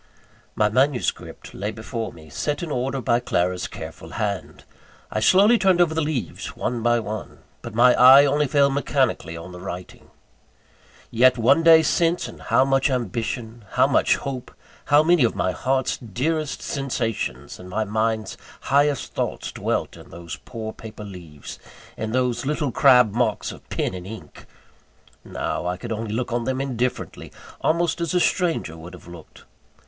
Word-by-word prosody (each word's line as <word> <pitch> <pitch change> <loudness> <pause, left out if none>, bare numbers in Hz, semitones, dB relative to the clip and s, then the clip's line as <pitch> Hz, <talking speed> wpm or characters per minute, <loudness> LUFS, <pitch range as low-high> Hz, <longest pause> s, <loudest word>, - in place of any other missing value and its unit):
VIII. - - -31
My 105 -1 +2
manuscript 130 +3 -1
lay 100 +2 -3
before 110 +1 -5
me, 80 -1 -15
set 145 - -3
in 165 - -5
order 135 +1 -1
by 120 0 +2
Clara's 90 -6 -1
careful 80 0 -9
hand. 100 -5 -4 0.5
I - - -1
slowly 200 - +5
turned 190 -3 +3
over 170 -3 +3
the 160 - 0
leaves 145 - -4
one 120 -1 -2
by 120 +1 +3
one; 110 -2 -7 0.2
but - - -8
my 125 +2 +6
eye 135 +3 +8
only 145 +1 +1
fell 140 0 +3
mechanically 130 - 0
on 85 +2 -9
the 90 - -10
writing. 90 0 -8 1.0
Yet 125 +2 +4
one 125 +7 +4
day 165 -1 +7
since, 170 +2 +1
and - - -12
how 130 - +3
much 135 +1 +2
ambition, 120 -2 -3
how - - +4
much - - +3
hope, 130 -3 -6 0.3
how 145 +1 +5
many 170 -3 +4
of 115 - +1
my 95 - 0
heart's 130 +6 -1
dearest 140 - -3
sensations 115 - -3
and 90 - -10
my 110 +4 -1
mind's 110 +1 -1 0.2
highest 140 0 +1
thoughts - - -3
dwelt - - -2
in - - -14
those 85 -1 -8
poor 110 -2 -6
paper 110 -1 -10
leaves, 85 -8 -10 0.4
in 110 0 -4
those 125 0 0
little 150 0 -1
crabbed 125 -5 +5
marks - - 0
of - - -14
pen - - -2
and 90 0 -7
ink! 100 -8 -11 0.8
Now 90 - -3
I 90 0 -2
could 115 +5 -7
look 115 +2 -3
on 120 -1 -1
them 130 +1 -1
indifferently 125 -2 -3 0.3
almost 170 +1 +1
as 170 +1 -1
a - - +4
stranger 170 - 0
would 85 +3 -10
have 90 - -16
looked. 85 -3 -13
120 Hz, 165 wpm, -23 LUFS, 105-140 Hz, 1.0 s, eye